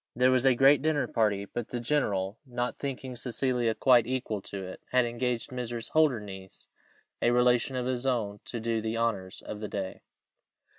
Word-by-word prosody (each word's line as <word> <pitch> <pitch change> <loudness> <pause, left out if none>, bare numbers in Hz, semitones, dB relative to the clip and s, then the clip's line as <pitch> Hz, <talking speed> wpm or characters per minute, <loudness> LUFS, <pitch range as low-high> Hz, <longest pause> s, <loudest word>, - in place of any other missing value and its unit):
There 125 +2 +4
was 130 0 +2
a 130 -2 +5
great 135 +3 +6
dinner 155 -1 +1
party, 105 -3 +1
but 120 +3 -5
the 120 - -4
general, 105 -7 0
not 125 -2 -3
thinking 130 -2 -4
Cecilia 125 -1 0
quite 120 -4 +5
equal 125 -5 -2
to 95 0 -7
it, 95 - -9
had 125 -1 +3
engaged 120 0 -2
Mrs. 120 -2 -5
Holdernesse, 105 -11 -1 0.5
a - - +4
relation 125 +2 +3
of 125 -1 -1
his 130 0 -1
own, 105 -5 -1
to 120 - -5
do 115 0 -1
the 110 +1 -2
honours 105 -5 -2
of 105 - -6
the 105 - -4
day. 95 -2 -4
120 Hz, 180 wpm, -29 LUFS, 110-130 Hz, 0.5 s, great